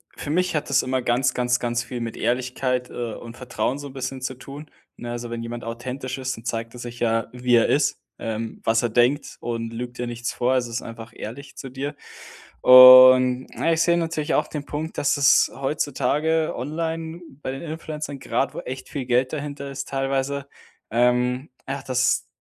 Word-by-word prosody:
für - - -7
mich 180 +2 +1
hat 150 -1 -2
das 135 -2 +3
immer 130 0 -1
ganz, 125 +1 +1
ganz, 125 0 +1
ganz 120 0 -1
viel 120 +1 -6
mit 115 -1 -4
Ehrlichkeit, 125 +1 -1
äh, 120 -3 -4
und 115 0 -10
Vertrauen 125 +2 -2
so 145 - -7
'n 135 - -12
bisschen 130 0 -5
zu 130 +1 -3
tun, 140 +4 -10 0.3
ne? 120 - -6
Also, 120 0 -5
wenn 120 0 -4
jemand 120 +1 -6
authentisch 125 +3 -5
ist, 130 -1 -3
dann 115 - -13
zeigt 115 0 -4
er - - -9
sich 120 0 -8
ja, 115 -1 +1
wie 125 0 +1
er 115 - +5
ist, - - +1 0.2
ähm, 115 0 -5
was 115 +1 +2
er 120 - +1
denkt 120 +6 +1
und 115 -1 -4
lügt 120 +1 -6
dir 125 - -3
nichts 120 -1 -4
vor 125 +2 0
also, 125 -2 0
ist 115 +1 -4
einfach 115 0 -9
ehrlich 135 +6 -8
zu 135 - -7
dir. 140 +3 -5 0.7
Und, 130 0 +9
na 165 - +1
ich 165 - +1
sehe 170 0 +3
natürlich 160 -2 -1
auch - - +1
den 145 -2 -6
Punkt, 155 +3 -5
dass 145 0 +2
es 140 -2 +5
heutzutage 150 +3 0
online 160 +4 -4 0.2
bei 130 - -3
den 135 - -6
Influencern, 155 -3 -6
grad 135 0 -1
wo - - -4
echt 130 +1 -7
viel 140 -3 -4
Geld 125 +2 +1
dahinter 145 -2 -5
ist 135 0 -5
teilweise 135 +1 -1 0.4
ähm, 125 +3 +1 0.2
ach, 135 +1 -4
dass 130 -1 +1
130 Hz, 200 wpm, -23 LUFS, 120-140 Hz, 0.7 s, Und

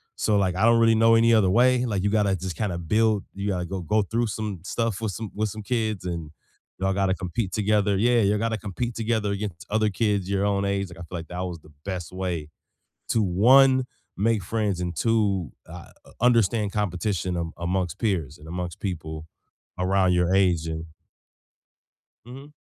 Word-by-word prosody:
so 105 - +1
like, 95 -2 +1
I 110 - +3
don't 115 0 +5
really 115 -1 +5
know 115 +1 +5
any 115 +1 +5
other 105 -5 +4
way, 125 +4 +4
like 100 -5 -1
you 100 - +2
gotta, 100 -2 +2
just 90 -2 -5
kind 105 -4 -1
of 85 -1 -6
build 110 -2 +2
you 100 +1 -4
gotta 90 -2 -1
go 95 +2 -4
go 105 +6 +1
through 115 +4 -1
some 105 -3 -4
stuff, 115 -1 -1
with 110 -4 -2
some 110 -3 -6
with 110 +1 -1
some 110 0 -7
kids 110 -4 -1
and 85 -4 -4 0.5
y'all 95 +1 +1
gotta 95 -1 +1
compete 95 +3 -3
together 105 -1 +2
yeah, 120 +4 +3
you 105 0 +2
gotta 115 +1 -1
compete 110 +4 -4
together 110 -2 0
against 100 -4 -5
other 110 0 +2
kids 100 -1 0
your 100 0 +1
own 100 -1 +1
age, 100 -1 -1
like 85 - -12
I - - -7
feel 85 +1 -7
like 80 - -10
that 90 - -6
was 85 -2 -7
the 75 - -19
best 90 -4 -4
way, 90 -5 -3 0.6
to 115 - +2
1, 130 +8 +5 0.3
make 110 0 +1
friends 105 -2 -1
and 90 -2 -3
2, 100 - +1 0.2
ah 85 +1 -10 0.2
uh - - -15
understand 115 -4 +3
competition 95 -3 -1
amon 85 -1 -3
amongst 90 +1 -2
peers, 85 - -1
and 75 - -13
amongst 90 0 -5
people 80 -4 -5 0.5
around 95 0 +2
your 90 +1 +2
age 90 -4 +2
and 80 0 -4 1.4
Mhm. 135 +4 -11
100 Hz, 195 wpm, -25 LUFS, 90-110 Hz, 1.4 s, don't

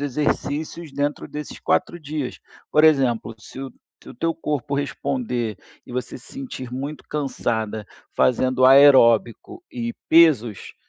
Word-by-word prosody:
exercícios 150 +3 -2
dentro 145 +1 -2
desses 150 0 -8
4 175 -1 0
dias. 150 -3 -5 0.3
Por 150 - +4
exemplo, 130 -7 +3
se 130 +5 -11
o 135 - -6 0.4
teu 165 +7 -1
corpo 145 -3 -3
responder 125 -5 -2 0.3
e - - -12
você 125 +1 -5
se 125 - -18
sentir 255 - -7
muito 140 +4 -6
cansada 110 -7 -3 0.3
fazendo 130 +1 +2
aeróbico 135 - +5
e 235 -2 -4 0.2
pesos, 140 - +4
140 Hz, 120 wpm, -22 LUFS, 125-150 Hz, 0.4 s, aeróbico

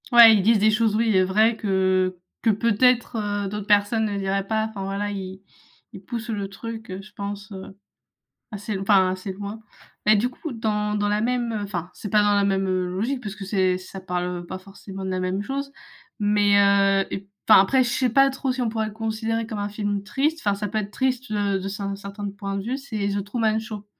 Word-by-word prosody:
Ouais, 235 -2 +10
ils 205 - +3
disent 220 +2 +4
des 215 +2 +4
choses 215 0 +2
oui, 225 -2 +2
heu, 185 - +5
vraies 215 +5 +3
que 185 -3 +1 0.2
que, 230 - +2
peut-être, 235 +3 +2 0.3
heu, - - -2
d'autres 210 +1 -5
personnes 205 +2 +3
ne 205 -1 -2
diraient 195 0 -1
pas. 220 +1 0
Enfin, 200 -3 -6
voilà, 200 +1 -2
ils 190 -1 -6 0.5
ils 190 - -9
poussent 235 +2 -5
le 200 -3 -3
truc, 225 +2 -8
heu, 185 +1 -5
je 210 - -16
pense, 200 +1 -6
heu, 190 0 -9 0.7
assez 210 0 -5
l 195 - -2
enfin, 195 -2 +4
assez 185 +1 -5
loin 205 +3 -7 0.4
et 215 - +6
du 225 +5 +1
coup, 280 +4 -7
dans 210 -2 -1
dans 205 0 0
la 210 +1 +1
même, 240 0 0
heu 210 - -2
enfin, 180 -4 -4
c'est 205 - -7
pas 210 +1 +4
dans 205 0 +3
la 200 0 +3
même, 195 -1 +1
heu, 185 -1 0
logique 225 +9 -2
parce 205 -3 -5
que 200 -2 -8
c'est 185 -2 +1
ça 185 +1 -10
parle, 180 -1 -2 0.2
heu, 175 - -10
pas 185 - -6
forcément 195 0 -9
de - - -2
la 185 0 -1
même 185 +2 -1
chose. 275 +4 -4 0.5
Mais 205 -1 +3
heu 195 -1 +4
et - - -3
p 195 - -24 0.2
enfin, 215 - +9
après, 260 +7 +3
je 245 - 0
sais 250 +1 +1
pas 275 +4 +5
trop 270 -1 -2
si 255 - -4
on 240 - +1
pourrait 220 -1 -1
le - - -9
considérer 225 +1 -2
comme 220 -2 -5
un 205 0 -2
film 205 -1 -2
triste. 285 +10 -1
Enfin, 205 -2 +2
ça 205 +1 -3
peut 215 - -5
être 205 -1 -3
triste, 255 0 -1
heu, 200 -2 0
de 195 - -4
cer 200 0 -4
certains 200 +1 -6
points 195 0 -5
de - - -3
vue, 250 +4 -2
c'est 220 -7 -3
The 200 -1 -2
Truman 220 +1 0
Show. 215 -2 -7
205 Hz, 240 wpm, -24 LUFS, 195-225 Hz, 0.7 s, Ouais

